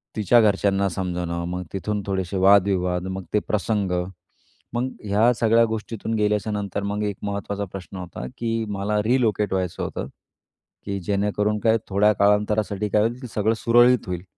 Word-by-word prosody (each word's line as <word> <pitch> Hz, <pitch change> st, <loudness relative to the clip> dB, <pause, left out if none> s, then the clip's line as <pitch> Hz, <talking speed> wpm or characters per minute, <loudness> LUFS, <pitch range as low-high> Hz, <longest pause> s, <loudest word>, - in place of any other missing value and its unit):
तिच्या 110 Hz, +3 st, +4 dB
घरच्यांना 100 Hz, -2 st, +2 dB
समजवणं 85 Hz, -2 st, -3 dB
मग 90 Hz, 0 st, -3 dB
तिथून 105 Hz, +2 st, -2 dB
थोडेसे 95 Hz, 0 st, -2 dB
वादविवाद. 95 Hz, -2 st, +3 dB
मग 95 Hz, 0 st, -4 dB
ते 105 Hz, -, +4 dB
प्रसंग. 105 Hz, -2 st, -1 dB, 0.8 s
मग 125 Hz, +2 st, -1 dB
ह्या 105 Hz, +4 st, +3 dB
सगळ्या 115 Hz, +1 st, +4 dB
गोष्टीतून 110 Hz, 0 st, -4 dB
गेल्याच्यानंतर 105 Hz, -1 st, -1 dB
मग 105 Hz, +1 st, -2 dB
एक 100 Hz, -2 st, -2 dB
महत्त्वाचा 100 Hz, 0 st, -3 dB
प्रश्न 95 Hz, 0 st, -8 dB
होता, 90 Hz, -8 st, -7 dB
की 115 Hz, -1 st, -1 dB
मला 105 Hz, +1 st, -1 dB
रिलोकेट 110 Hz, -4 st, +1 dB
व्हायचं 90 Hz, -2 st, -2 dB
होतं, -, -, -4 dB, 0.8 s
की 100 Hz, -1 st, -3 dB
जेणेकरून 105 Hz, +2 st, 0 dB
काय 110 Hz, +2 st, +3 dB
थोड्या 105 Hz, +2 st, +4 dB
काळांतरासाठी 105 Hz, 0 st, +1 dB
काय 105 Hz, +1 st, +3 dB
होईल, 120 Hz, +2 st, -1 dB
की 125 Hz, -, -6 dB
सगळं 110 Hz, +1 st, +2 dB
सुरळीत 120 Hz, -1 st, +4 dB
होईल. 90 Hz, -1 st, -4 dB
105 Hz, 150 wpm, -23 LUFS, 95-110 Hz, 0.8 s, तिच्या